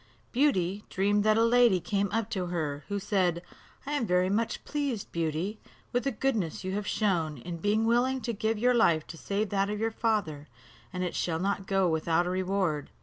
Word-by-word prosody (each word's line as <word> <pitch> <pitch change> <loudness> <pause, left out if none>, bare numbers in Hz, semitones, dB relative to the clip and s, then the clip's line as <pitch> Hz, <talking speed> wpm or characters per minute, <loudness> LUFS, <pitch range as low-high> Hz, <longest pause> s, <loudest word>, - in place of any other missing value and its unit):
Beauty 210 -8 +1
dreamed 205 +2 +2
that 215 0 +4
a 225 - +4
lady 235 -5 +5
came 200 +1 -1
up 225 0 0
to 185 -2 -2
her, 155 -5 -3
who 205 - -2
said, 185 -4 0 0.4
"I 285 - -4
am 285 -6 0
very 180 +1 +2
much 225 +3 -1
pleased, 280 -8 -3
Beauty, 170 +6 -2 0.3
with 245 +2 0
the 275 - +1
goodness 215 - -1
you 185 - -3
have 205 +1 -3
shown, 170 -8 0
in 170 +7 -6
being 205 +5 +1
willing 245 +3 +2
to 235 +1 -2
give 220 +1 -1
your 250 +3 +3
life 170 -10 +3
to - - -9
save 200 +4 -2
that 195 0 +1
of 210 0 -3
your 225 +1 0
father; 200 -11 -1 0.4
and 180 -1 -3
it 180 - -2
shall 165 -2 -1
not 195 +2 -2
go 195 -1 +2
without 165 +1 +1
a 180 - -1
reward." 185 -5 -1
200 Hz, 205 wpm, -29 LUFS, 175-225 Hz, 0.4 s, lady